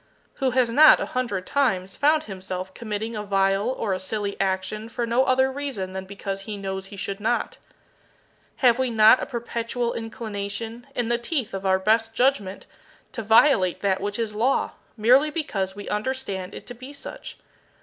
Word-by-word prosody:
Who 265 - +1
has 250 -2 +2
not, 305 +6 +8
a - - -1
hundred 220 -8 -2
times, 195 -10 0
found 305 +2 +3
himself 185 -2 -6
committing 220 +1 -4
a 210 - -3
vile 195 +1 +1
or 225 -6 -1
a 185 - -2
silly 200 +1 -3
action 195 +3 -2
for 235 +1 -2
no 235 +3 +2
other 260 +1 +3
reason 260 -10 -4
than 190 0 -5
because 195 0 -5
he 205 +1 -6
knows 190 -1 -5
he 200 - -11
should 195 +1 -4
not? 230 +3 -1 1.1
Have 240 0 +5
we 260 -1 +1
not 220 +2 +6
a - - -3
perpetual 235 0 -3
inclination, 225 +1 -5
in 240 -2 -1
the 235 0 +1
teeth 245 -2 -2
of 195 0 -3
our 190 0 +4
best 225 +3 +1
judgment, 225 -7 +1 0.5
to 230 - -5
violate 220 - +4
that 195 -2 +1
which 205 +1 -3
is 225 -2 -2
Law, 240 +6 +1 0.3
merely 255 +7 +5
because 200 - -3
we 205 - -8
understand 210 -4 -3
it - - -9
to 245 - -8
be 255 +4 -11
such? 280 - -8
220 Hz, 180 wpm, -24 LUFS, 195-245 Hz, 1.1 s, not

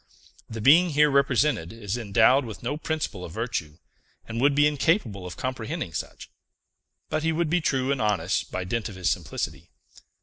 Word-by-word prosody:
The 110 -1 -6
being 165 +9 +6
here 150 -1 +4
represented 140 - +2
is 110 -2 -4
endowed 115 +4 +3
with 115 -2 -8
no 125 +5 -2
principle 150 - -3
of 85 - -8
virtue, 85 -10 -4 0.5
and 115 +1 -3
would 140 +1 +4
be 145 +1 +5
incapable 145 - +1
of 90 - -9
comprehending 115 -9 -4
such; 75 - -6 0.8
but 155 - -1
he 165 +1 +1
would 160 -1 -1
be 175 0 +2
true 135 -3 0
and 140 - -1
honest 100 -4 0
by 95 - -3
dint 115 +5 -3
of 100 - -10
his 90 -1 0
simplicity. - - -4
120 Hz, 175 wpm, -26 LUFS, 105-145 Hz, 0.8 s, being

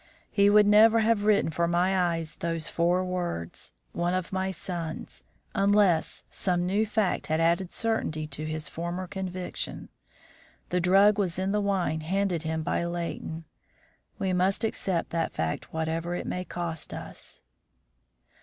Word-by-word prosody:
He 200 0 +4
would 210 0 +6
never 220 +2 +6
have 220 -2 +2
written 210 -6 +3
for 170 +2 +1
my 175 0 +2
eyes 165 -1 -5
those 165 -1 -2
four 175 +2 +1
words 175 - -4 0.2
'one 175 +1 0
of 185 +1 -3
my 190 0 0
sons' 170 -3 -5 0.3
unless 200 -4 +3
some 175 -2 0
new 205 +4 +1
fact 210 -3 0
had 155 0 +1
added 170 +2 +2
certainty 220 -9 -1
to 155 +1 -3
his 155 -1 -3
former 175 +4 -4
conviction. 185 -1 -5 0.8
The 180 0 +1
drug 195 +4 +5
was 180 -4 0
in 190 +1 0
the 210 0 +1
wine 180 -6 0
handed 185 +1 0
him 160 0 -2
by 170 - 0
Leighton; 170 -1 -4 0.7
we 190 -1 0
must 185 +3 +1
accept 190 -5 -1
that 165 -1 -1
fact 80 0 -3
whatever 160 +2 -2
it - - -4
may 180 0 -3
cost 170 -3 -4
us." - - -9
180 Hz, 150 wpm, -28 LUFS, 165-195 Hz, 0.8 s, would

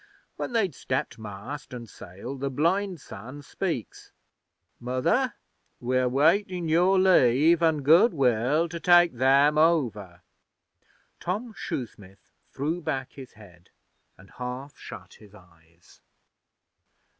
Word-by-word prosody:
'When - - -5
they'd 200 -8 +1
stepped 130 -2 -4
mast 110 +7 -8
an' 120 -1 -8
sail 100 +5 -9
the 140 +1 -3
blind 175 +6 0
son 130 +5 -10
speaks: 160 - -5 0.7
"Mother, 165 - 0 0.4
we're 125 +1 0
waitin' 170 +6 +1
your 175 +4 +3
Leave 165 -3 +4
an' 160 -3 +2
Good 170 - +6
will 135 +3 +1
to 170 0 -7
take 175 -2 +5
Them 140 +4 +3
over."' 115 - 0 1.0
Tom 215 +6 -4
Shoesmith 100 - -8 0.2
threw 160 +6 -3
back 130 -4 -3
his 135 -2 -12
head 90 -6 -18 0.5
and 95 +2 -18
half 125 +3 -7
shut - - -11
his 105 -1 -17
eyes. 85 -3 -22
140 Hz, 115 wpm, -26 LUFS, 120-170 Hz, 1.0 s, Good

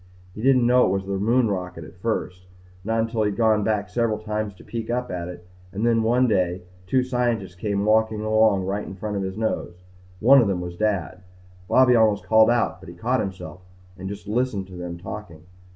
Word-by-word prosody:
He 105 - -8
didn't 130 -1 +4
know 125 +1 +5
it - - +2
was 95 0 -1
the 100 0 -2
moon 115 +4 +2
rocket 90 -4 -4
at 85 +3 -14
first. 90 -5 -3 0.4
Not 115 +2 0
until 115 0 -1
he'd 105 -2 0
gone 110 -1 +3
back 105 -1 0
several 110 +3 0
times 105 -1 -4
to - - -16
peek 115 -1 -6
up 125 +1 -2
at 85 -1 -4
it 90 -1 -10 0.3
and 100 +4 -2
then 115 -1 +3
one 120 +3 +3
day 90 -4 0 0.2
two 130 +6 +2
scientists 120 -7 -1
came 100 +2 -2
walking 110 0 +2
along 110 -3 +3
right 100 +2 -2
in 95 - -8
front 105 +2 -4
of - - -1
his 95 +1 -4
nose. 110 -5 -2 0.4
One 135 +6 +7
of 115 - +1
them 95 -3 0
was 90 0 -6
Dad. 100 -3 -1 0.5
Bobby 130 -1 +5
almost 110 -3 +3
called 110 0 +5
out 120 -1 +1
but - - -12
he 85 - -11
caught 125 +8 0
himself 95 -3 -6 0.3
and 95 0 -7
just 100 0 -8
listened 110 -3 -1
to 90 - -10
them 90 -1 -6
talking. 90 -3 -9
105 Hz, 215 wpm, -23 LUFS, 95-115 Hz, 0.5 s, One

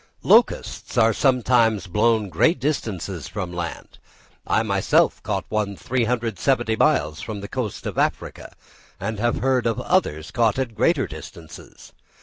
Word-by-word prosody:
Locusts - - +2
are 115 -1 +4
sometimes 120 -5 +2
blown 110 +4 +2
to 100 - -7
great 165 - +2
distances 100 - -3
from 90 -4 -5
the 85 - -8
land. 85 -1 -6 0.5
I - - +2
myself - - +2
caught 100 -3 -3
one 105 -2 -1
370 120 0 0
miles 75 -7 +1
from 105 -3 -6
the 100 - -6
coast 120 -5 -4
of - - -3
Africa, - - -2 0.5
and 110 +1 -4
have 120 +2 +1
heard 130 -2 +1
of 115 - -1
others 80 +1 0
caught 115 -1 +1
at 130 -4 -2
greater 145 +3 +2
distances. 80 +1 -12
110 Hz, 145 wpm, -22 LUFS, 95-125 Hz, 0.5 s, are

